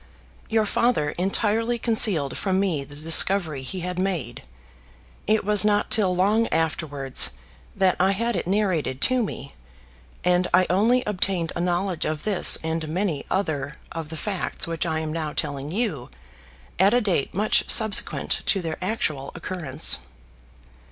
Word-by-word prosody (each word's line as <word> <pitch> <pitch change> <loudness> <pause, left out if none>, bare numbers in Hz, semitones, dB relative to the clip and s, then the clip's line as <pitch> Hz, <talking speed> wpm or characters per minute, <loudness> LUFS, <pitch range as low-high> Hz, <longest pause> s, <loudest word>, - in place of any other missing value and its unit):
Your 220 -1 +2
father 210 -9 +1
entirely 220 +5 0
concealed 210 - +3
from 190 -1 -1
me 175 -8 -1
the 145 +1 -13
discovery 160 0 +2
he 180 +8 -6
had 180 +1 -4
made. 170 - -3 0.9
It 215 -1 +2
was 210 -2 +4
not 210 -1 +1
till 190 -4 +2
long 210 +5 +2
afterwards 145 - +1 0.4
that 190 -2 +2
I 190 +2 +3
had 230 +4 -1
it - - -3
narrated 185 -9 -1
to 255 -1 +3
me, 140 - -6 0.7
and 180 0 +2
I 185 0 +4
only 230 +7 +2
obtained 185 -4 -1
a 170 - -2
knowledge 180 0 -1
of 155 -1 -3
this 205 -4 +5
and 160 0 -3
many 170 -1 -2
other 155 -6 -2 0.2
of 165 -2 -6
the 160 - -7
facts 195 +3 -2
which 165 0 -2
I 160 -1 -1
am 155 -1 -4
now 155 -2 -4
telling 145 -2 -4
you 190 - -2 0.7
at 195 +5 +4
a 245 - +3
date 180 -10 -1
much 210 +3 +2
subsequent 220 -2 +2
to 195 - +2
their 160 -1 -4
actual 155 -9 -3
occurrence. 165 -5 +1
180 Hz, 150 wpm, -23 LUFS, 155-205 Hz, 0.9 s, this